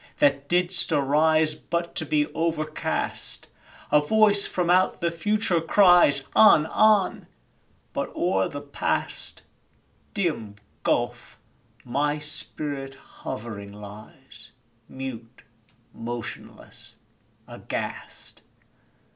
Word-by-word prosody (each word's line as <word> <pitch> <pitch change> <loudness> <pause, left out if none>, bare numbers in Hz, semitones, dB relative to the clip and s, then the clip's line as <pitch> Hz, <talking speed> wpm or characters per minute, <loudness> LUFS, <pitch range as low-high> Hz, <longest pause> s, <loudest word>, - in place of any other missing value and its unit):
that 140 0 +2
didst 180 0 +2
arise 155 +2 +3
But 170 +2 -4
to 160 - -1
be 150 0 +2
overcast! 160 -2 -3 0.4
A 150 - +5
voice 205 +4 +4
from 180 -2 -1
out 185 +1 +3
the 170 -1 0
future 185 0 0
cries, 175 -5 +5
"On! 185 -8 +7
on!" 210 +2 +2 0.7
but - - -2
o'er - - +1
the - - -7
Past - - -3 0.7
(Dim 150 - -2 0.3
gulf!) - - -1 0.5
my 145 +4 0
spirit 145 -2 -4
hovering 110 -6 -8
lies 110 +3 -12 0.4
Mute, 125 -3 -8 0.5
motionless, 115 0 -8 0.5
aghast! - - -7
150 Hz, 90 wpm, -25 LUFS, 135-175 Hz, 0.7 s, On